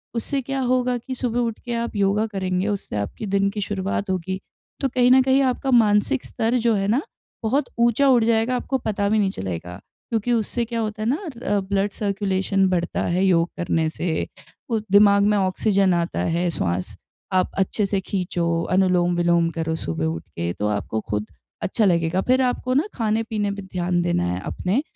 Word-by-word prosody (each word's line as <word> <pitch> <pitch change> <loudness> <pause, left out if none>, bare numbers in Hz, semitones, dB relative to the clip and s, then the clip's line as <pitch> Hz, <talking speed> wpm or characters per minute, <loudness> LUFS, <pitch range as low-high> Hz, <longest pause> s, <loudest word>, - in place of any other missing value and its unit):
उससे 270 +4 -1
क्या 270 +1 -3
होगा 250 0 +1
कि 260 +2 -6
सुबह 245 -2 -1
उठ 230 -2 -1
के 240 - -3
आप 235 -1 -3
योगा 200 +2 +2
करेंगे, 185 -2 -2
उससे 200 - -3
आपकी 100 - -4
दिन 200 0 +1
की 205 0 -4
शुरुआत 195 0 -2
होगी, 185 +1 -2 0.4
तो 275 - +1
कहीं 250 0 +3
न 260 0 +7
कहीं 265 +1 +3
आपका 265 +1 0
मानसिक 225 +3 +3
स्तर 230 +3 0
जो 235 -1 +2
है 195 0 0
ना 235 +7 +2 0.4
बहुत 260 +5 +1
ऊँचा 235 +4 +4
उठ 240 -3 +5
जाएगा, 230 +2 +2
आपको 265 +2 -1
पता 205 -4 -1
भी 215 - +3
नहीं 200 -2 +2
चलेगा 90 - -5 0.3
क्योंकि 230 +1 0
उससे 235 +1 0
क्या 230 0 -3
होता 215 -1 -3
है - - -1
ना 280 - +2 0.3
अ, 205 0 +2
ब्लड 195 +1 -1
सर्कुलेशन 195 -1 0
बढ़ता 175 -1 -1
है 185 +2 +2
योग 175 -2 +3
करने 165 -2 0
से, 160 0 -2 0.4
वो 225 -2 +1
दिमाग 200 0 +6
में 210 0 +3
ऑक्सीजन 195 0 +2
आता 170 0 -1
है, 170 +1 0
स्वास 90 - -2 0.4
आप 185 0 +2
अच्छे 195 +2 +1
से 195 0 0
खींचो, 175 -3 -1
अनुलोम-विलोम 175 -2 +3
करो 160 0 -2
सुबह 80 - -3
उठ 80 +1 -2
के, 85 +1 -2
तो 105 - -2
आपको 105 +1 -2
खुद 105 0 -2 0.3
अच्छा 215 +2 +1
लगेगा, 170 0 +2
फिर 255 +4 +2
आपको 255 0 0
ना 285 +5 +3
खाने-पीने 220 -2 -1
पे 200 0 -5
ध्यान 180 -2 -1
देना 170 - +1
है 90 - -2
अपने, 195 +9 -1
200 Hz, 190 wpm, -23 LUFS, 175-230 Hz, 0.4 s, न